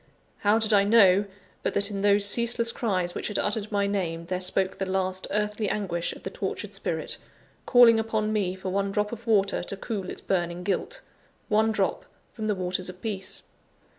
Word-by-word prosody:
How 210 +1 +3
did 220 -1 +2
I 200 -1 +6
know, 200 -2 +5 0.4
but - - -2
that 200 +1 +1
in 200 -1 -3
those 200 0 +4
ceaseless 235 +2 +3
cries 185 -8 -1
which - - -3
had 210 - -3
uttered 210 0 -1
my 200 -1 +1
name, 175 -5 -2
there 185 +1 -3
spoke 190 +1 0
the 195 - -1
last 185 0 0
earthly 210 0 -1
anguish 175 -5 -2
of - - -13
the - - -5
tortured - - -4
spirit, - - -3 0.5
calling 240 -3 +7
upon 220 -1 -1
me 190 -4 0
for 190 0 -5
one 195 +1 -1
drop 210 +1 -1
of 235 0 -8
water 200 -3 +2
to 195 +2 -4
cool 195 -3 -4
its - - -5
burning 175 -1 -2
guilt 205 - -2 0.5
one 220 +1 +3
drop - - -1 0.3
from 220 -2 -4
the 210 - +1
waters 185 0 -2
of 180 0 -10
Peace? 195 -2 -3
200 Hz, 195 wpm, -26 LUFS, 185-220 Hz, 0.5 s, calling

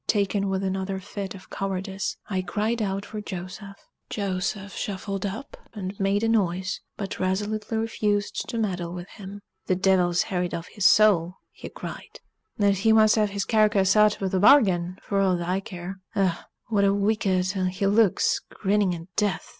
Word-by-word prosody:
Taken 200 -1 +1
with 190 0 -1
another 190 0 -2
fit 195 0 -6
of 190 - -14
cowardice, 195 0 -3
I 190 -2 -1
cried 215 +5 -1
out 195 -1 -2
for 215 -1 -6
Joseph. 195 +1 -7 0.3
Joseph 195 0 -3
shuffled 195 0 -3
up 225 +9 -7 0.2
and 190 -2 -4
made 200 +2 +1
a - - +2
noise, 190 -3 0 0.2
but 195 -2 -5
resolutely 210 +4 -1
refused 210 -2 -1
to 230 - -3
meddle 180 -6 -2
with 175 0 -7
him. 200 -1 -10 0.3
"Th' 185 -1 +1
divil's 180 -2 +3
harried 180 -2 -2
off 165 - -6
his 205 -3 +3
soul," 185 -5 +4 0.2
he - - -9
cried, - - -9 0.4
"and 200 -1 +3
he 215 +4 +2
muh 220 0 +6
hev 215 -2 +2
his 200 -1 -2
carcass 210 -4 +3
intuh 210 -3 +3
t' 190 - +1
bargain, 185 -7 +5
for 200 - -1
ow't 185 -2 +2
aw 180 +2 -1
care! 190 0 -7 0.2
Ech! 190 -3 +3 0.4
what 205 -3 +2
a 200 0 +3
wicked 200 -2 +1
un 185 -1 0
he 185 +2 -2
looks, 205 0 +3
grinning 200 -2 +1
at 165 - -8
death!" 205 -6 -1
195 Hz, 170 wpm, -25 LUFS, 185-210 Hz, 0.4 s, muh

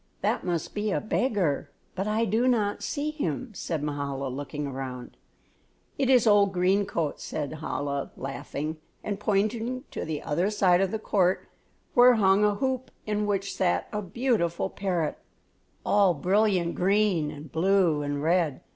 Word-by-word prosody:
"That - - 0
must 175 -3 -2
be 210 +1 -1
a - - +1
beggar, 195 - 0 0.2
but 195 +2 -3
I 220 +2 +1
do 225 +5 +1
not 215 -5 +1
see 300 +1 -2
him," 255 - -3
said 160 -5 -3
Mahala, 140 -2 -3
looking 145 +3 -5
around. 130 -2 -6 0.8
"It 270 -2 0
is 250 -3 +5
old 205 -2 +5
green 190 +2 +2
coat," 165 -6 -2
said 155 0 -4
Chola, 140 -2 -3
laughing, 140 +3 -5 0.3
and 205 -1 -3
pointing 220 +5 0
to - - -4
the 155 -2 -4
other 175 +7 0
side 185 -4 +3
of 195 - +2
the 220 - -2
court 190 -3 +1 0.5
where 245 0 +7
hung 195 -1 +4
a 210 -1 +3
hoop 260 +2 -2 0.2
in 210 0 -1
which 200 -1 -1
sat 180 -2 0
a 210 - -1
beautiful 200 -4 0
parrot, 175 -6 -2 0.7
all 200 -4 +4
brilliant 185 +1 +2
green 190 -4 +2
and 150 0 -9
blue 175 -2 +3
and 145 0 -2
red. 165 -4 +1
190 Hz, 155 wpm, -27 LUFS, 155-210 Hz, 0.8 s, where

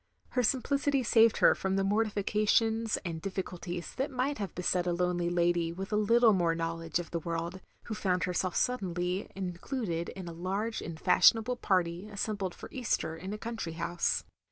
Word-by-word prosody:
Her 250 - +1
simplicity 275 +2 +1
saved 225 -1 +5
her - - +6
from 190 0 -2
the 195 - +2
mortifica 210 0 0
tions 225 0 +3
and 165 -2 -4
difficulties 180 -2 -5
that 265 +2 0
might 265 0 -1
have 200 -5 -4
beset 180 0 0
a 175 - +1
lonely 175 0 0
lady 175 -1 +1
with 195 +4 -6
a - - +3
little 225 +2 +5
more 170 -3 +2
knowledge 165 0 -2
of 175 -1 -6
the 170 - -1
world, 170 +3 -4 0.2
who 225 - -5
found 185 -4 0
herself 180 0 -1
suddenly 185 -5 -1
included 180 -1 -3
in 185 -2 -8
a 170 - -6
large 195 +6 -2
and 160 -1 -7
fashionable 225 +6 +5
party 180 -2 0
assembled 200 -3 -3
for - - -9
Easter 235 -10 -1
in 185 +4 -7
a 210 - -3
country 225 -7 -5
house. 170 +1 -1
190 Hz, 180 wpm, -30 LUFS, 175-220 Hz, 0.2 s, her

